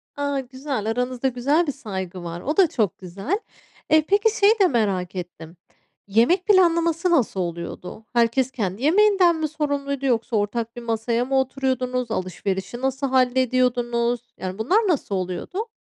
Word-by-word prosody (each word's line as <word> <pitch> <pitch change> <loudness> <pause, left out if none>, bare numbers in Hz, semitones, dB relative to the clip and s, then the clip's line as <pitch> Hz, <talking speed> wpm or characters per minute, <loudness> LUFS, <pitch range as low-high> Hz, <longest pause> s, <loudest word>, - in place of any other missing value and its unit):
A! 285 -1 -1
Güzel. 260 -3 -5
Aranızda 250 +2 -1
güzel 280 +7 +1
bir - - +1
saygı 190 -8 -6
var. 170 0 -6
O 300 +6 -2
da 375 -3 +6
çok 215 -10 -1
güzel. 195 - -3 0.5
Eee, 310 -1 +4
peki, 420 +3 +2
şeyi 420 +2 +5
de 380 - +6
merak 195 - -1
ettim. 170 -1 -8 0.5
Yemek 240 - +3
planlaması 340 -3 +3
nasıl 245 - +2
oluyordu? 175 +4 -5
Herkes 240 +2 +2
kendi 210 -1 -3
yemeğinden 375 +1 +4
mi 315 -1 -1
sorumluydu 285 -2 -2
yoksa 235 -2 0
ortak 225 +2 -1
bir 240 - -7
masaya 230 +1 -1
mı 265 +1 +1
oturuyordunuz? 255 -2 -1
Alışverişi 190 +4 -3
nasıl 270 +1 -1
hallediyordunuz? 250 -2 +1 0.2
Yani, 185 0 -5
bunlar 250 - +2
nasıl 280 - 0
oluyordu? 185 - -4
250 Hz, 150 wpm, -23 LUFS, 215-295 Hz, 0.5 s, da